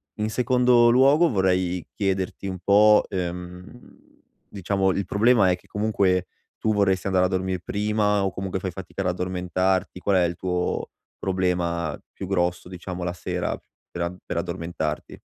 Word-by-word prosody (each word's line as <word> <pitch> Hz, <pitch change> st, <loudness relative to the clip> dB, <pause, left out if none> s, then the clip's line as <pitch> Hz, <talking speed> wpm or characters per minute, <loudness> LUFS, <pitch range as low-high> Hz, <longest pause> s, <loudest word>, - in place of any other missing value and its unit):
in 105 Hz, 0 st, -2 dB
secondo 125 Hz, 0 st, +4 dB
luogo 140 Hz, +7 st, +5 dB
vorrei 90 Hz, -3 st, +1 dB
chiederti 95 Hz, -1 st, -2 dB
un 95 Hz, -2 st, -4 dB
po' 105 Hz, +2 st, +5 dB
ehm, 90 Hz, +4 st, -6 dB, 0.5 s
diciamo 95 Hz, 0 st, 0 dB
il 100 Hz, +1 st, -2 dB
problema 105 Hz, +1 st, +4 dB
è -, -, +2 dB
che 90 Hz, -, -22 dB
comunque 100 Hz, -3 st, +1 dB, 0.3 s
tu 110 Hz, -, 0 dB
vorresti 95 Hz, -2 st, +1 dB
andare 95 Hz, -1 st, +3 dB
a -, -, +3 dB
dormire 95 Hz, -1 st, -1 dB
prima 105 Hz, +1 st, 0 dB
o 95 Hz, -, 0 dB
comunque 95 Hz, 0 st, -4 dB
fai 95 Hz, 0 st, -4 dB
fatica 95 Hz, +2 st, -7 dB
ad 95 Hz, -, -1 dB
addormentarti, 90 Hz, +1 st, -1 dB
qual 100 Hz, +1 st, +1 dB
è 90 Hz, -, +4 dB
il 85 Hz, 0 st, -1 dB
tuo 90 Hz, 0 st, -2 dB, 0.3 s
problema 90 Hz, -4 st, -1 dB
più 95 Hz, -, -7 dB
grosso 90 Hz, -2 st, 0 dB
diciamo 90 Hz, 0 st, -6 dB
la 90 Hz, 0 st, -2 dB
sera 90 Hz, 0 st, -3 dB
pe 85 Hz, +1 st, -7 dB
per -, -, -4 dB
addormentarti? 80 Hz, -2 st, -4 dB
95 Hz, 155 wpm, -24 LUFS, 90-100 Hz, 0.5 s, luogo